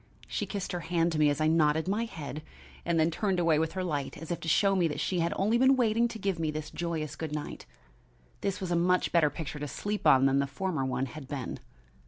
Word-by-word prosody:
She - - -3
kissed 200 -3 -4
her 175 - -2
hand 170 0 0
to 155 - -1
me 150 -1 +5
as 145 +1 -1
I 155 - +2
nodded 155 0 +3
my 210 +4 0
head, 150 - -7 0.4
and 170 -1 +1
then 160 +1 +3
turned 190 +1 0
away 165 -3 +3
with 160 0 -1
her 185 - -2
light 145 -6 -3
as 165 +3 -7
if 170 - -2
to 170 - -7
show 195 +4 +3
me 175 -3 +2
she 180 - -1
had 170 0 +1
only 215 +5 +2
been 260 +1 +6
waiting 235 -1 +2
to 230 - -7
give 195 -4 -2
me 160 -1 0
this 155 0 -5
joyous 160 -3 -3
good 155 -1 -5
night. 150 - -6 0.7
This 195 - -2
was 185 -2 -4
a - - +2
much 180 +2 +2
better 165 -3 +4
picture 150 0 -6
to 150 - -4
sleep 205 +8 -2
on 130 0 +6
than 135 0 +3
the 140 - +1
former 155 +1 -2
one 130 0 -1
had 135 +1 -9
been. 135 -3 -5
165 Hz, 250 wpm, -29 LUFS, 150-185 Hz, 0.7 s, been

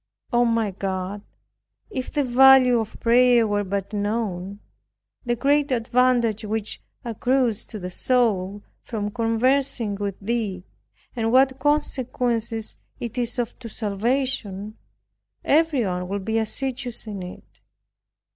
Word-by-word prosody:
Oh, 240 0 +4
my 230 -3 +1
God, 190 +1 -4 0.7
if 260 -10 -4
the 290 - +1
value 255 -1 +6
of 220 -1 -5
prayer 240 0 +5
were 205 -1 0
but 200 +1 -3
known, 205 -2 -2 0.7
the 240 - +2
great 285 +3 +2
advantage 235 -2 +2
which 215 0 -3 0.2
accrues 240 0 0
to 220 - -8
the 180 -2 -6
soul 205 -4 0 0.2
from 210 -3 -4
conversing 235 0 +1
with 200 -1 -4
Thee, 210 -4 -2 0.5
and 225 -1 0
what 260 +1 +4
consequence 250 -6 0 0.5
it 235 0 -5
is 245 0 -1
of 240 -1 -3
to 235 -2 -8
salvation, 215 -1 -2 0.7
everyone 250 - +2
would 195 0 -4
be 225 +1 +1
assiduous 245 +1 -2
in 205 -3 -6
it. 180 0 -11
230 Hz, 120 wpm, -23 LUFS, 205-250 Hz, 0.7 s, value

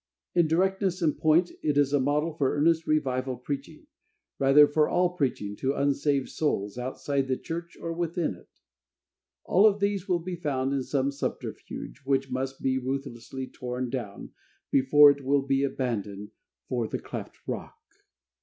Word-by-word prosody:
In 170 -2 +4
directness 190 +2 +1
and 155 -3 +2
point, 165 +3 +3
it 150 -2 0
is 145 -1 +3
a 145 - +4
model 150 +4 +1
for 140 -4 0
earnest 160 +2 +2
revival 130 -4 0
preaching, 140 +3 -6 0.5
rather, 140 +2 +7
for 150 +1 +2
all 180 0 +3
preaching 125 - -2
to 135 +2 -1
unsaved 140 -1 +1
souls, 105 -10 -1
outside 135 +2 -2
the 130 -1 0
church, 170 +1 -6
or 165 - -4
within 170 - -1
it. 90 - -17 0.9
All 200 +4 +5
of 205 -1 +2
these 200 -2 -1
will 180 - +3
be 175 +1 -5
found 140 -5 -1
in 135 - 0
some 135 +1 0
subterfuge, 140 - -6
which 135 -1 0
must 135 +1 -3
be 130 0 +1
ruthlessly 130 -1 -4
torn 125 -1 -5
down, 120 -7 -5 0.4
before 145 +2 +7
it 140 0 -5
will 140 +1 +2
be 135 0 +1
abandoned 105 -7 -3 0.4
for 120 -3 -1
the - - -3
cleft - - -7
Rock. - - -5
140 Hz, 160 wpm, -27 LUFS, 130-160 Hz, 0.9 s, rather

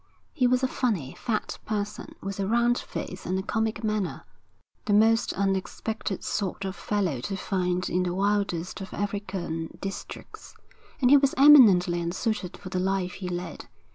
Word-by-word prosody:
He 250 - +3
was 250 +1 +2
a - - +4
funny, 205 - -1
fat 220 -3 -3
person 210 -1 -4
with 195 0 -5
a 195 - 0
round 235 +2 +2
face 185 - -6
and 185 +1 0
a 190 - -2
comic 220 0 -1
manner, 215 -3 -2 0.6
the 205 - +1
most 225 +2 +4
unexpected 195 +1 -2
sort 195 -1 -2
of 190 0 -4
fellow 190 -12 -1
to 195 +9 -3
find 180 -2 -1
in 180 - 0
the 180 -1 -1
wildest 200 -2 -1
of 190 - -7
African 190 -5 -4
districts; 195 0 -8 0.5
and 250 0 +5
he 285 - +9
was 275 -1 +2
eminently 205 -12 +7
unsuited 180 +2 -2
for 185 - -9
the 185 - -2
life 190 -1 0
he 185 -2 -5
led. 180 0 -5
195 Hz, 165 wpm, -27 LUFS, 180-220 Hz, 0.6 s, he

